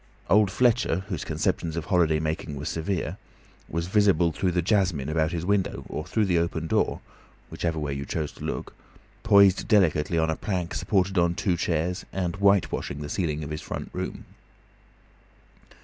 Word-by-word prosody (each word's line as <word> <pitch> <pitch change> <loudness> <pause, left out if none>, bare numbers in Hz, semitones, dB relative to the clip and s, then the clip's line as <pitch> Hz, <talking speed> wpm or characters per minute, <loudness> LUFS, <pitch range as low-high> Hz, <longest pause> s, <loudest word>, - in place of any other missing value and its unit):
Old 105 -1 +5
Fletcher, 115 -6 +2
whose 90 -6 -3
conceptions 80 -2 -1
of 80 - -3
holiday 85 -5 +2
making 80 -1 -3
were 70 +2 -6
severe, 85 +4 -2 0.5
was 85 +2 -2
visible 95 -3 +3
through 80 +5 -1
the 90 0 0
jasmine 90 -8 +1
about 80 0 +1
his 85 -1 -3
window 100 -1 0
or 75 - -4
through 110 +3 +1
the 90 -3 +2
open 85 -1 -2
door - - 0 0.5
(whichever 85 -2 -2
way 75 -2 -2
you 70 0 -4
chose 75 +1 -3
to - - -13
look), - - -4 0.5
poised 100 -4 +5
delicately 85 -6 +3
on 80 0 +2
a - - -1
plank 90 -3 -3
supported 95 -2 +1
on 85 0 +2
two 90 -1 0
chairs, 85 +2 -1
and 90 -1 -2
whitewashing 100 -7 +1
the 75 - -6
ceiling 75 -3 -2
of 75 - -6
his 75 - -4
front - - -6
room. - - -5
85 Hz, 170 wpm, -26 LUFS, 80-95 Hz, 0.5 s, Old